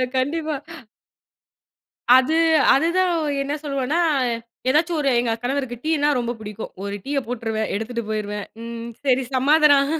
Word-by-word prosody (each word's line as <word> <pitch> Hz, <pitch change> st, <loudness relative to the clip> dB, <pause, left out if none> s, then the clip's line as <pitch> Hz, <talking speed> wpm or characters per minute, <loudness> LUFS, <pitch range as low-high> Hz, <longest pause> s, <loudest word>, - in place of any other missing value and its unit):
கண்டிப்பா. 310 Hz, +5 st, -1 dB, 1.6 s
அது 260 Hz, +4 st, +4 dB, 0.4 s
அது 280 Hz, +5 st, +3 dB
தான். 370 Hz, -1 st, +3 dB, 0.3 s
என்ன 280 Hz, +1 st, -2 dB
சொல்லுவனா 275 Hz, +1 st, -1 dB, 0.7 s
எதாச்சும் 325 Hz, +5 st, +2 dB
ஒரு 280 Hz, -2 st, +1 dB
எங்க 235 Hz, -1 st, +1 dB
கணவருக்கு 260 Hz, 0 st, -2 dB
டீனா 305 Hz, -2 st, +1 dB
ரொம்ப 240 Hz, -1 st, -1 dB
பிடிக்கும். 215 Hz, 0 st, -7 dB
ஒரு 200 Hz, 0 st, -4 dB
டீய 280 Hz, 0 st, -1 dB
போட்டுருவேன், 225 Hz, -2 st, -2 dB
எடுத்துட்டு 230 Hz, +3 st, -3 dB
போயிருவேன். 210 Hz, -1 st, -3 dB, 0.2 s
ம், 230 Hz, 0 st, -6 dB, 0.2 s
சரி 265 Hz, -1 st, +3 dB
சமாதானம். 285 Hz, +1 st, +5 dB
260 Hz, 125 wpm, -22 LUFS, 230-290 Hz, 1.6 s, சமாதானம்